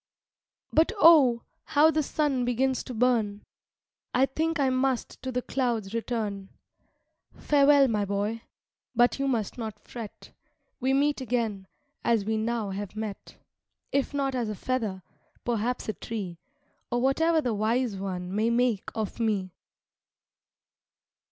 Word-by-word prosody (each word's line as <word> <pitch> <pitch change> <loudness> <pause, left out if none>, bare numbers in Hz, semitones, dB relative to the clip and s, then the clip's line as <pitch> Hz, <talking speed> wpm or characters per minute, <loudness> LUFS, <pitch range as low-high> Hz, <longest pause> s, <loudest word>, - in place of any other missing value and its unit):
"But, 320 +6 +4
oh, 285 -10 +6 0.2
how 315 +1 +4
the 310 0 +1
sun 285 -3 0
begins 255 +2 0
to 255 - -6
burn! 220 -4 +1 0.7
I 260 +2 +5
think 320 +4 -1
I 270 -2 +3
must 255 -1 -1
to 260 - -4
the 250 0 -2
clouds 235 -6 -1
return. 215 -4 -3 0.9
Farewell, 285 -1 +5
my 215 -4 0
boy! 205 +3 -2 0.5
but 240 +3 +3
you 275 - 0
must 235 -3 -1
not 220 -2 -5
fret; 230 -4 -10 0.5
We 260 0 +1
meet 285 +1 +2
again, 225 -6 -2 0.4
as 225 -4 +2
we 220 +1 0
now 220 -2 -1
have 200 +1 -5
met, 215 -2 -6 0.5
If 280 -1 0
not 275 -2 -1
as 240 -4 -1
a 210 - -3
feather, 215 -5 -2 0.4
perhaps 240 +1 -1
a 215 - -1
tree, 195 -8 -6 0.5
Or 240 - +1
whatever 320 +6 +3
the 245 -7 -1
Wise 220 +2 0
One 185 -1 -4
may 215 +3 +2
make 235 -3 +1
of 220 -1 -3
me." 200 -5 0
235 Hz, 140 wpm, -27 LUFS, 215-265 Hz, 0.9 s, oh